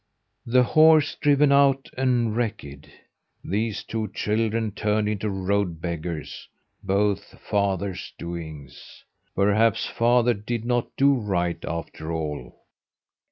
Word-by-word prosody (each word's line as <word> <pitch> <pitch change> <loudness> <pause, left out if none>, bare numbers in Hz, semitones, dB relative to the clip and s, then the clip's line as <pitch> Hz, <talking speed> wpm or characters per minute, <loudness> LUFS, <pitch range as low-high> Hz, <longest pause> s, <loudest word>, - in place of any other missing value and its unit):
"The 125 +2 +4
horse 155 +2 +5
driven 145 0 +3
out 140 -1 +4
and 125 -4 +1
wrecked, 105 - -4 0.5
these 110 +1 -2
two 110 -1 -3
children 110 +1 -1
turned 105 +1 0
into 105 0 -2
road 95 -3 -1
beggars 85 -2 -5 0.3
both 100 +1 -1
father's 100 -2 -2
doings! 80 -6 -9 0.3
Perhaps 105 +2 +2
father 120 0 +2
did 115 +2 -4
not 120 -1 0
do 140 +1 +5
right 95 -8 -1
after 85 -1 -5
all?" 75 -6 -5
105 Hz, 110 wpm, -24 LUFS, 90-120 Hz, 0.5 s, horse